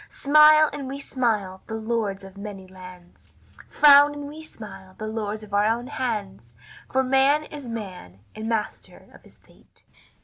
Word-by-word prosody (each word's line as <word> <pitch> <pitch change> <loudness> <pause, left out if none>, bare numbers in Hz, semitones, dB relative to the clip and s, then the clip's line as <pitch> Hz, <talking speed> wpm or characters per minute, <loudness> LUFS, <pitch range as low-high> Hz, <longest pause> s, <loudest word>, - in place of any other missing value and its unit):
Smile, 305 +2 +6
and 280 -2 -6
we 275 +1 -6
smile, 215 -9 -2
the 220 - -5
lords 220 -3 -3
of 195 0 -12
many 200 -1 -8
lands; 180 -1 -15 0.4
Frown, 290 0 +6
and 290 -1 -7
we 305 +2 -10
smile, 210 -10 -12
the 215 - -6
lords 215 -1 -4
of 205 -1 -13
our 205 +1 +3
own 235 +2 -1
hands, 210 - -5 0.4
For 265 0 +2
man 270 +3 +3
is 290 -4 -10
man, 185 - -8
and 220 +1 -6
master 220 -2 -5
of - - -17
his - - -20
fate." - - -23
220 Hz, 165 wpm, -24 LUFS, 195-275 Hz, 0.4 s, Smile